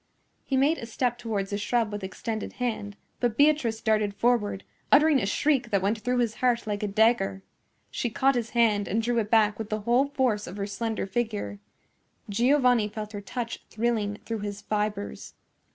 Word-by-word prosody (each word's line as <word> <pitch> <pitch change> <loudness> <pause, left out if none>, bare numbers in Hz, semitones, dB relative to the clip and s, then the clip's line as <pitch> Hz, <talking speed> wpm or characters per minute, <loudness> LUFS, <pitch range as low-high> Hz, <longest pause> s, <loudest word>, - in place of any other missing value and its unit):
He 270 - -1
made 290 +5 +3
a 230 - -7
step 240 +1 -1
towards 210 -4 -3
the 205 - -1
shrub 220 +1 0
with 205 -1 -5
extended 220 +3 -4
hand; 215 -5 -3 0.2
but 240 -2 0
Beatrice 285 -7 +3
darted 215 -2 +1
forward, 220 -5 +1 0.3
uttering 300 0 +6
a 195 - -1
shriek 270 +2 +1
that 200 -3 +1
went 210 +3 +1
through 250 +3 -1
his 235 -3 +1
heart 245 -2 +1
like 205 -1 -3
a 210 - -1
dagger. 200 -2 +2 0.5
She 240 - -2
caught 270 +4 +2
his 235 -3 -2
hand 210 -4 +3
and 225 +4 0
drew 235 0 +1
it 210 -2 -2
back 215 -2 +3
with 220 -1 -5
the 215 0 -2
whole 240 +6 +3
force 255 -7 0
of 185 - -8
her 200 - -2
slender 215 +2 -3
figure. 210 -1 -3 0.7
Giovanni 245 0 +3
felt 210 0 -6
her 205 - -5
touch 230 +4 -5
thrilling 220 -2 -1
through 225 -1 -3
his 205 0 -5
fibres. 210 -1 -3
220 Hz, 185 wpm, -27 LUFS, 205-245 Hz, 0.7 s, uttering